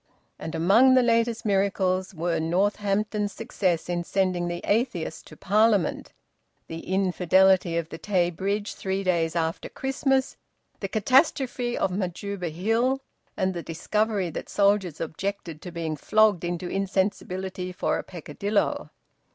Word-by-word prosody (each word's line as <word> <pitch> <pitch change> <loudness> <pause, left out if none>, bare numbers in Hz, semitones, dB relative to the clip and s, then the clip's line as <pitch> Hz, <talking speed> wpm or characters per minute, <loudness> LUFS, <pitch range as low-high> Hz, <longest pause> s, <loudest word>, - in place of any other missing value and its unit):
And 160 +1 -5
among 225 +11 +5
the 255 - +5
latest 230 -1 +1
miracles 190 -2 +1
were 170 -1 -1
Northampton's 205 +4 0
success 190 -7 -1
in 175 -1 -1
sending 185 -1 0
the 175 0 -4
atheist 205 -8 -1
to - - -13
Parliament, 210 -1 +2 0.5
the 165 - -7
infidelity 185 -1 +3
of 165 -1 -2
the 160 - -8
Tay 180 -4 +1
Bridge 200 +4 -2
three 190 0 -3
days 170 -3 +1
after 165 -1 -2
Christmas, 270 0 0 0.4
the 195 - -3
catastrophe 250 - +2
of 190 - 0
Majuba 185 0 -3
Hill, 225 - 0 0.3
and 190 0 0
the 170 - -4
discovery 200 +3 -1
that - - -6
soldiers 200 -5 +2
objected 165 -1 -4
to 180 - -8
being 165 -2 -3
flogged 210 +3 +3
into 175 0 -3
insensibility 190 -1 -2
for 180 - -1
a - - -5
peccadillo. 195 +5 -2
190 Hz, 135 wpm, -26 LUFS, 175-210 Hz, 0.5 s, among